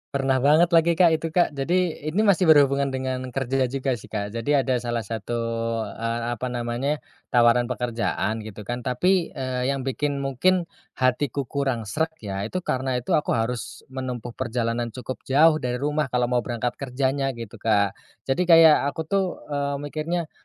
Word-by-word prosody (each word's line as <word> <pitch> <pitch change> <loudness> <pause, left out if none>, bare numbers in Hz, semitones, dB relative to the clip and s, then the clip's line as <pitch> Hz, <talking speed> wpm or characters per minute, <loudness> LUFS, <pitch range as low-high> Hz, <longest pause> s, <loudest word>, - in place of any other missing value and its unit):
Pernah 135 -1 +2
banget 155 +6 +4
lagi 170 0 +4
Kak 170 -1 +5
itu, 160 +1 0
Kak. 170 0 +2
Jadi 160 +2 -1
ini 195 +8 +1
masih 190 -3 +3
berhubungan 140 -2 +5
dengan 130 -1 -2 0.2
kerja 135 -1 0
juga 130 -1 -2
sih, - - -13
Kak. 105 -1 -4
Jadi 115 +6 0
ada 130 -3 +2
salah 120 -2 -2
satu, 110 +2 -4 0.6
eee, 115 +1 -3
apa 120 +2 -3
namanya, 125 +4 -2 0.2
tawaran 120 -1 +4
pekerjaan, 115 -3 -2
gitu 105 -1 -8
kan, 120 +4 -4
tapi, 170 +9 +1
eee, 130 -1 -2
yang 135 -1 -1
bikin 140 +1 -2
mungkin, 175 +8 +2 0.3
hatiku 130 +2 0
kurang 135 -3 -2
sreg 150 +11 -1 0.2
ya, 100 0 -3
itu 185 +9 -4
karena 130 -3 -1
itu 125 - -3
aku 150 - +2
harus 115 +1 -3
menempuh 125 -3 -5
perjalanan 120 -1 -2
cukup 125 +2 -7
jauh 155 +3 +5
dari 125 0 -2
rumah 150 +2 -1
kalau 125 -1 0
mau 125 - +3
berangkat 120 0 -3
kerjanya, 135 0 -1
gitu 115 -3 -9
Kak. 100 -3 +2 0.3
Jadi 170 +7 0
kayak 165 -4 +7
aku, 160 +3 -3
tuh, 190 +2 -1
eee, 140 0 -1
mikirnya, 155 +3 -3
130 Hz, 170 wpm, -24 LUFS, 120-150 Hz, 0.6 s, kayak